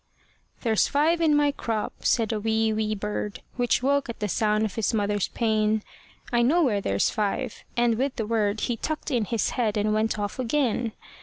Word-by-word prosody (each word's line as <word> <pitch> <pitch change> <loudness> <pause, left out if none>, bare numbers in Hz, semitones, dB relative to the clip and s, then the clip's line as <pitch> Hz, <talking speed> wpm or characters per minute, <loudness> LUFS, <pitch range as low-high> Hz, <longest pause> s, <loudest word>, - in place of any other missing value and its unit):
"There's 225 -3 +2
five 320 +4 +2
in 310 -2 +4
my 290 -1 +3
crop," 225 -6 -3
said 225 -2 +1
a 215 - -1
wee, 220 0 +1
wee 215 0 -1
bird, 210 0 -4
Which 245 0 +1
woke 280 -1 +1
at 235 - -6
the 210 - -1
voice 205 - -2
of 215 -1 +2
his 225 0 0
mother's 205 -2 0
pain; 215 -2 +1 0.5
"I 240 - +4
know 315 +9 +4
where 210 -8 +1
there's 100 - +1
five." 215 +3 -2
And 235 -1 +2
with 270 0 0
the 225 -5 -2
word 210 -1 0
He 240 - -1
tucked 310 +4 -3
in 240 -5 +1
his 230 0 0
head, 220 -4 0
and 210 +1 +1
went 215 0 +1
off 205 +3 -4
again. 245 -3 0
225 Hz, 200 wpm, -26 LUFS, 210-250 Hz, 0.5 s, in